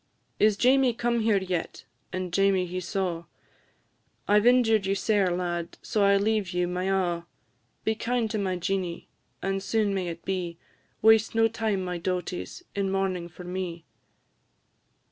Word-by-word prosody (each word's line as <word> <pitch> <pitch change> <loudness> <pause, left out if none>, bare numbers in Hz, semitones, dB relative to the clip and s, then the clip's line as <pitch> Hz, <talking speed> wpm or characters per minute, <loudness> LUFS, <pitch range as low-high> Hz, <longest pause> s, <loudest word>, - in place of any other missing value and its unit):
"Is 210 -1 +4
Jamie 255 0 +4
come 235 0 0
here 220 -2 +3
yet?" 185 -3 -3 0.3
and 185 -1 -4
Jamie 195 -1 +3
he 180 +1 -4
saw; 175 -2 -2 1.0
"I 205 +1 +5
've 215 - +2
injured 225 -5 +4
you 195 - +1
sair, 200 -1 +2
lad, 175 -1 -3
so 210 - +1
I 200 0 +5
leave 210 -1 +1
you 180 -1 0
my 180 +1 -2
a'; 180 -3 0 0.6
Be 220 - +1
kind 235 +1 -1
to 215 - -1
my 190 -2 -1
Jeanie, 180 -1 -3 0.3
and 195 0 -1
soon 210 0 +1
may 190 -2 -1
it 170 0 -7
be! 180 -3 -3 0.5
Waste 220 0 +5
no 225 0 +5
time, 220 -4 -1
my 180 -1 -3
dauties, 180 - -4
in 200 -2 -1
mournin' 190 -3 -1
for 175 +2 -11
me." 180 -2 -5
195 Hz, 160 wpm, -27 LUFS, 180-215 Hz, 1.0 s, I